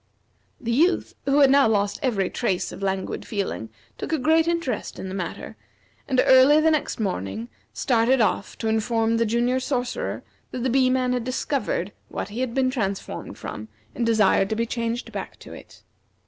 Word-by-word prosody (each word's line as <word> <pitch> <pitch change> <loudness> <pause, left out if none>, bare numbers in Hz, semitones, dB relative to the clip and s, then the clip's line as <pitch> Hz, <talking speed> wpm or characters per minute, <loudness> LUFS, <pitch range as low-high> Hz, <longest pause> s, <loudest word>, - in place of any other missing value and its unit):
The 235 - -3
Youth, 325 +10 +2
who 280 +1 +3
had 275 -1 +6
now 275 -3 +6
lost 205 -2 +1
every 215 -9 +1
trace 195 -7 -1
of - - -9
languid 190 -1 -2
feeling, 195 - -3 0.3
took - - -4
a 320 - +2
great 320 +4 +3
interest 335 -9 -2
in 190 - -6
the - - -6
matter, 185 -3 -5 0.5
and 260 -2 +1
early 265 +3 +7
the 320 +1 +4
next 305 -5 -1
morning 110 - -3 0.2
started 230 - +2
off 210 -2 0
to 225 - -3
inform 225 +1 +1
the 230 0 +1
Junior 240 +3 +1
Sorcerer 250 -2 -2 0.3
that 250 - -5
the 260 - +1
Bee 260 0 +4
man 255 -1 +1
had 250 -2 -1
discovered 260 - -2 0.2
what - - -4
he 215 +4 -6
had 255 -2 -2
been 260 -1 +2
transformed 200 -7 -4
from, 110 - -7 0.3
and - - -2
desired 215 -4 +3
to 220 - -1
be 230 +1 0
changed 235 0 -3
back - - -6
to - - -12
it. - - -14
235 Hz, 185 wpm, -24 LUFS, 210-260 Hz, 0.5 s, early